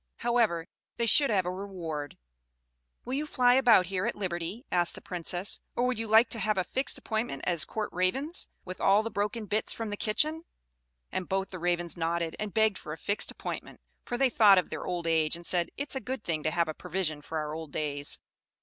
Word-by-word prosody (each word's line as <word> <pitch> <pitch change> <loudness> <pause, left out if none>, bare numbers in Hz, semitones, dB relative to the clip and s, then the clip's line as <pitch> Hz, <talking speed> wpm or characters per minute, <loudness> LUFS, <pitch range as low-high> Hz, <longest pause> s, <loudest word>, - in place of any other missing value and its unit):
However, 230 -9 +1 0.3
they 235 - 0
should 280 +5 +5
have 195 -5 +2
a 180 - -1
reward. 175 -7 -5 0.9
"Will 255 - -4
you 295 +3 -1
fly 245 -4 +4
about 245 -7 +6
here 185 +3 -1
at - - -1
liberty," 185 - -4
asked 175 -1 +2
the - - -6
Princess; 180 +2 -1 0.2
"or 245 - +2
would 250 -3 0
you 225 - -3
like 220 +3 +6
to 230 - -4
have 215 0 +1
a 185 - +2
fixed 265 +8 -2
appointment 220 - -3
as 170 -3 +3
court 215 -1 -3
ravens, 265 - 0 0.2
with 185 0 -7
all 200 +2 +5
the 225 - -4
broken 210 +2 -2
bits 210 +2 +1
from 225 -2 -4
the - - -2
kitchen?" 300 +10 +1 0.7
And 185 - -3
both 195 0 -1
the 185 - -6
Ravens 175 0 0
nodded, 165 0 -1
and 210 -1 -3
begged 220 -2 +2
for 150 - -6
a - - -7
fixed 205 +5 -1
appointment; - - -6 0.2
for 245 - -3
they 265 0 +3
thought 210 -4 +7
of 185 - +1
their - - -4
old 175 -2 -2
age, 160 -1 +2
and 170 0 -9
said, 175 -1 +2
"It 285 0 -3
is - - +3
a - - 0
good 255 0 -5
thing 160 -2 -1
to 155 - +1
have 170 +1 +1
a 155 - -3
provision 170 -3 -2
for 160 +2 -5
our 150 -1 -3
old 160 -2 -6
days." 145 -1 -1
190 Hz, 220 wpm, -29 LUFS, 170-225 Hz, 0.9 s, thought